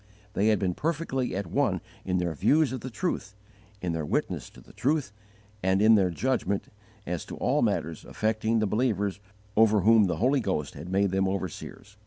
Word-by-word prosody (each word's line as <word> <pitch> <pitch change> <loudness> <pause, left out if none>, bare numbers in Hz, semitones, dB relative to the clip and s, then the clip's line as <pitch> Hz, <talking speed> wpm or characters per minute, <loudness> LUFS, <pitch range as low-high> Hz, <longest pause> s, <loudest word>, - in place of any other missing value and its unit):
They 105 - +2
had 110 -1 +4
been 95 -3 0
perfectly 145 - -2
at 100 +1 -2
one 85 - +1 0.3
in 90 -1 0
their 90 -2 -1
views 135 - +3
of 130 - -4
the 130 - -5
truth, 110 - -3 0.5
in 90 - 0
their 80 -1 -2
witness 75 - -2
to - - -16
the - - -17
truth, 140 -6 0 0.5
and 95 +1 +2
in 110 +2 +6
their 95 -4 +4
judgment 100 +1 -1 0.4
as 85 -1 -3
to - - -7
all - - +1
matters 80 0 -1
affecting 110 +1 0
the 110 - +2
believers 105 -3 0 0.4
over 110 -2 +5
whom 110 +2 +6
the 90 -4 -1
Holy 130 - +3
Ghost 95 - -2
had 80 +5 -8
made 100 0 +2
them 95 0 +1
overseers. 95 -3 -5
100 Hz, 190 wpm, -27 LUFS, 95-115 Hz, 0.5 s, in